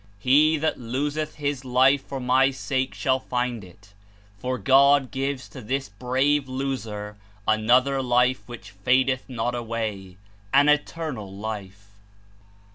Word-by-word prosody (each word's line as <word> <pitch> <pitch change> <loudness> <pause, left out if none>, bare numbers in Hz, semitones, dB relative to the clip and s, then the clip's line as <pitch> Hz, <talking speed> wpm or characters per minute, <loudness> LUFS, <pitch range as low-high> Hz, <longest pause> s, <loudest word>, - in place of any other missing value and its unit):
"He 145 +8 +4
that 155 +1 -1
loseth 145 +6 -3
his 145 -3 -3
life 130 +2 +3
for 135 - -6
my 130 +1 +3
sake 130 -1 -2
shall 130 -1 +1
find 125 -4 -3
It," 100 +2 -17 0.5
for 130 +4 -2
God 140 0 +4
gives 135 0 -3
to 130 - -10
this 135 +3 -3
brave 130 +6 0
loser 115 -6 -4 0.3
another 125 +5 +3
life 125 0 +2
which 110 -4 -10
fadeth 130 +7 +1
not 120 -1 -2
away, 110 -6 -4 0.4
an 145 +2 +6
Eternal 150 -8 -1
Life. 100 -1 -7
130 Hz, 125 wpm, -24 LUFS, 110-135 Hz, 0.5 s, an